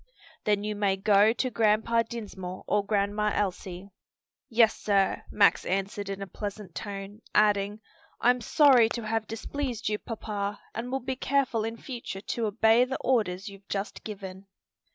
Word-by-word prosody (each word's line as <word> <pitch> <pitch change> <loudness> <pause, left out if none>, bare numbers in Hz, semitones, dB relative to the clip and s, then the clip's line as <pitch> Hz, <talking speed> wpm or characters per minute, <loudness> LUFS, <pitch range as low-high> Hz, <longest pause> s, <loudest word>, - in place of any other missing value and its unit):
"Then 205 -1 +2
you 210 0 -2
may 200 -2 +1
go 205 +2 +5
to 255 +2 -1
Grandpa 225 +1 +3
Dinsmore 200 -6 -7
or 205 0 +1
Grandma 205 +1 +1
Elsie." 190 -1 -3 0.6
"Yes, 225 -2 +4
sir," 195 -2 +1
Max 200 -5 +4
answered 195 +1 -2
in 195 0 -4
a - - -4
pleasant 200 -1 -7
tone; 200 +6 -6
adding, 210 0 +3 0.4
"I'm 245 +1 +3
sorry 250 -2 +5
to 235 - -5
have 220 0 -1
displeased 240 0 -3
you, 210 0 -1
papa, 205 -3 -4
and 240 +2 -4
will 270 0 -1
be 260 +2 -3
careful 260 -4 +1
in 225 +1 -4
future 235 -6 -6
to 230 +2 -2
obey 225 +3 +4
the 265 +1 -2
orders 210 -6 +1
you've 200 0 -11
just 200 +1 -4
given." 195 -2 -8
210 Hz, 155 wpm, -28 LUFS, 200-230 Hz, 0.6 s, go